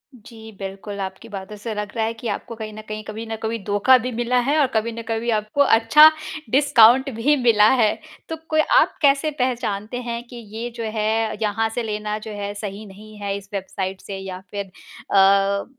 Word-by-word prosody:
जी, 220 -1 -13
बिल्कुल 195 +1 -7
आपकी 190 +4 -7
बातों 195 +1 -7
से 220 +2 -5
लग 210 0 -4
रहा 225 -1 0
है 225 - -2
कि 230 +1 -7
आपको 225 +3 -5
कहीं 215 -1 -7
न 215 - -8
कहीं, 215 0 -6
कभी 215 +2 -7
न 225 0 -4
कभी 225 +1 -1
धोखा 205 +6 +5
भी 250 +1 -4
मिला 240 +2 0
है 280 +5 +1
और 280 - +4
कभी 220 +1 0
ना 230 0 -6
कभी 230 +1 -2
आपको 215 +7 -1
अच्छा 280 +5 +7 0.4
डिस्काउंट 265 -1 +5
भी 270 +7 +2
मिला 215 -3 +5
है। 215 - +3 0.4
तो 320 - -3
कोई 310 0 +3 0.2
आप - - +1
कैसे 285 +1 +3
पहचानते 240 -3 -2
हैं 235 -1 -5
कि 245 - -12 0.2
ये 235 +2 -4
जो 230 - -5
है, 220 0 -1
यहाँ 220 +1 0
से 235 +2 -3
लेना 210 -1 -3
जो 220 - -6
है 205 0 -5
सही 205 0 -7
नहीं 210 +2 -13
है 200 -1 -2
इस 200 0 -13
वेबसाइट 190 -1 -4
से 195 -1 -7
या 190 -1 -7
फिर 200 -1 -4
अ, 195 +1 +1
220 Hz, 205 wpm, -22 LUFS, 205-235 Hz, 0.4 s, अच्छा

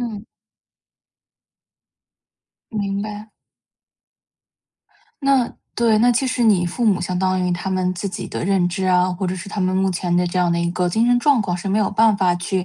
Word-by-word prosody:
嗯。 220 -3 -5 2.5
明 200 -2 -2
白。 210 0 -8 1.9
那 275 -3 +2 0.2
对， 230 -2 +2
那 240 +3 +4
其 245 +3 +1
实 255 -1 -1
你 205 -6 +3
父 235 +8 -3
母 205 -5 +3
相 180 -1 -2
当 185 0 0
于 180 0 0
他 175 +2 -3
们 185 -1 0
自 190 +3 -4
己 190 - -6
的 - - -5
认 190 -1 +2
知 185 +2 -3
啊， 180 0 +2
或 185 +2 -3
者 180 - -2
是 180 +2 -8
他 205 - -4
们 185 0 0
目 190 0 +1
前 175 -1 -2
的 180 0 +2
这 175 +1 -2
样 175 -1 +2
的 170 - 0
一 170 0 0
个 180 0 0
精 225 +6 +1
神 245 0 +4
状 275 0 +3
况， 180 -3 -2
是 180 - -5
没 200 +2 +1
有 205 -3 +1
办 215 0 +3
法 185 -3 +2
去 180 +1 -2
190 Hz, 215 characters per minute, -20 LUFS, 180-220 Hz, 2.5 s, 那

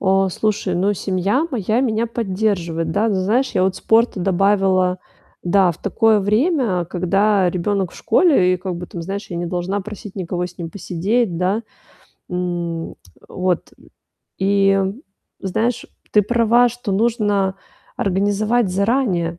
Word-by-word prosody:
А, 195 0 +2
слушай, 200 -1 -1
ну, 195 +4 +1
семья 195 - 0
моя 220 -2 0
меня 230 -3 0
поддерживает, 190 -7 -1
да. 215 +7 +1
Знаешь, 210 +8 +1
я - - +1
вот 190 0 0
спорта 225 -3 +2
добавила, 190 -1 +2 0.4
да, 180 0 +3
в 160 - -16
такое 215 +2 +3
время, 215 - +1
когда 190 +2 +2
ребёнок 190 +1 -1
в - - -13
школе, 190 - +3
и, - - -1
как 185 -1 -5
бы, 180 +1 -7
там, 170 -1 -7
знаешь, 195 +3 -5
я 175 - -4
не 175 0 -3
должна 180 +3 -2
просить 210 0 -9
никого 180 -1 -3
с 180 +1 -14
ним 165 -2 -5
посидеть, 195 +2 -1
да. 185 +6 0 0.7
М, 175 -2 -3 0.3
вот. 185 -2 -2 0.7
И, 195 0 +3 0.6
знаешь, 225 +6 -1 0.3
ты 210 - +5
права, 235 +2 +3
что 240 -3 -5
нужно 205 -3 +1 0.4
организовать 205 +3 +1
заранее, 190 -5 0
195 Hz, 140 wpm, -20 LUFS, 180-215 Hz, 0.7 s, ты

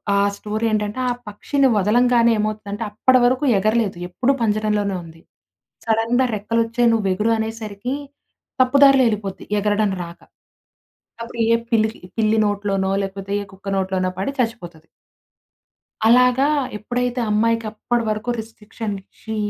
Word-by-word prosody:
ఆ - - +3 0.2
స్టోరీ 215 +2 -3
ఏంటంటే 210 +2 -1
ఆ - - +1 0.2
పక్షిని 270 +6 +1
వదలంగానే 235 +3 +3
ఏమవుతుందంటే 210 0 -3
అప్పటి 255 +5 +3
వరకు 255 +3 +2 0.2
ఎగరలేదు. 215 -2 0
ఎప్పుడు 255 +9 +1
పంజరంలోనే 210 -2 0
ఉంది. 165 0 -14 0.7
"సడెన్‌గా 230 +3 +2
రెక్కలొచ్చాయి, 230 +3 +1
"నువ్వెగురు" 210 0 +1
అనేసరికి 220 +2 -4 0.7
తప్పు 255 +2 +3
దారిలో 270 -1 +6
ఎళ్ళిపోద్ది, 200 -3 -4
ఎగరడం 210 0 +1
రాక. 170 0 -11 1.0
అప్పుడు 230 0 -8
ఏ - - +6 0.2
పిల్లికి 220 -1 +1 0.2
పిల్లి 220 0 +2
నోట్లోనో 200 -2 -1
లేకపోతే 195 0 -6
ఏ - - -11
కుక్క 195 +1 -8
నోట్లోనో 190 -1 0
పడి 200 +8 -1
చచ్చిపోతది. 175 -10 -3 1.2
అలాగా 250 +3 +5 0.3
ఎప్పుడైతే 245 +3 -2
అమ్మాయికప్పటి 230 +2 0
వరకు 215 +3 -2
రెస్ట్రిక్షన్ 220 -1 -6
ఇచ్చి 220 +3 -8
215 Hz, 120 wpm, -21 LUFS, 205-235 Hz, 1.2 s, దారిలో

